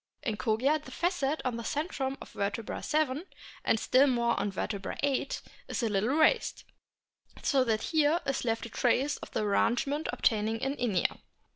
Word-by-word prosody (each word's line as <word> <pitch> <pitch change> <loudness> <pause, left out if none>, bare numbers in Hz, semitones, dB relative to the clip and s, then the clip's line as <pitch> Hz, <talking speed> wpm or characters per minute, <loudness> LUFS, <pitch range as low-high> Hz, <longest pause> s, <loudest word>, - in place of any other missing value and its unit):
In 225 -7 -1
Kogia 240 +10 +1
the - - -10
facet 325 -5 -1
on 245 -2 -1
the 235 - -5
centrum 275 -1 -2
of - - -10
vertebra 205 +2 -3
7, 305 -1 0 0.4
and 220 - +2
still 265 +5 +4
more 235 -2 +2
on 205 - 0
vertebra 195 0 -3
8, 280 -1 0 0.2
is - - -2
a 230 - +2
little 205 +2 +1
raised, 320 +10 +3 0.8
so 270 -3 +3
that 220 -2 0
here 310 +1 +4
is 275 -1 -1
left 225 -2 -1
a - - -7
trace 260 +5 +1
of - - -9
the - - -1
arrangement 245 +8 +1
obtaining 220 0 +1
in 270 +3 -1
Inia. 210 -8 0
255 Hz, 170 wpm, -30 LUFS, 220-285 Hz, 0.8 s, still